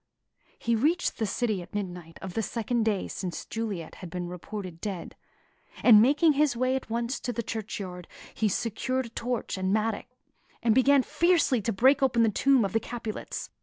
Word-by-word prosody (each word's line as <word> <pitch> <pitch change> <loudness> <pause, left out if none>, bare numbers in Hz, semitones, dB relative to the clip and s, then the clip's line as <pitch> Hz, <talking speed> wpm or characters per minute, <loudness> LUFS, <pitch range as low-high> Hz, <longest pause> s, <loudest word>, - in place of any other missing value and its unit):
He 230 0 0
reached 310 +9 +1
the 220 - 0
city 215 -2 -1
at 175 - -12
midnight 180 -4 -5
of 190 -2 -6
the 225 - 0
second 230 +1 -1
day 210 -4 0
since 180 -3 -5
Juliet 210 -8 -4
had 180 - -7
been 180 0 -4
reported 180 -1 -7
dead; 190 -5 -5 0.7
and 215 -4 +9
making 295 +6 +4
his 285 -4 +2
way 255 +1 +1
at 265 - -4
once 235 +3 -2
to 250 - -3
the 235 0 -3
churchyard, 190 -5 -5 0.3
he 215 - +1
secured 250 +5 -1
a - - -9
torch 235 -4 -3
and 185 0 0
mattock, 220 +2 0 0.6
and 230 -2 +4
began 270 +2 +5
fiercely 335 -8 +2
to 225 - -1
break 260 +7 +4
open 240 -3 +3
the 225 - +4
tomb 260 +2 +3
of 195 - -4
the 225 - +3
Capulets. 230 -2 -6
225 Hz, 185 wpm, -28 LUFS, 195-255 Hz, 0.7 s, and